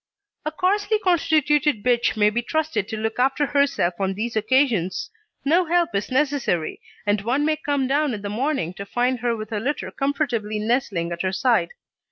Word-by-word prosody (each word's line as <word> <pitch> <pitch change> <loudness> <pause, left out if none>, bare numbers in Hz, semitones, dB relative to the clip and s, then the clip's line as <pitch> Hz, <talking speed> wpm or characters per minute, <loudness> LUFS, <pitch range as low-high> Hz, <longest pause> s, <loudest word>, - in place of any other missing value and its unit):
A - - 0
coarsely 410 +6 +1
constituted 310 - +2
bitch 240 -2 +2
may 210 0 +4
be 240 +3 0
trusted 270 -6 -1
to 220 - -4
look 220 +2 -3
after 270 +3 +2
herself 280 -11 +1
on 195 -1 -1
these 225 +3 -3
occasions; 240 - +1 0.3
no 340 +5 +3
help 340 -5 +1
is 200 +1 -1
necessary, 265 - 0 0.2
and 205 0 +1
one 255 +7 0
may 310 0 +1
come 285 -3 -1
down 280 -1 +1
in 205 - -8
the - - -3
morning 225 - -1
to 200 +1 -7
find 245 +3 0
her 240 0 0
with 215 0 -7
her 215 - -1
litter 280 +7 -3
comfortably 260 -7 -1
nestling 210 -6 -1
at 170 - -3
her 185 - 0
side. 235 +5 +2
250 Hz, 185 wpm, -23 LUFS, 210-295 Hz, 0.3 s, may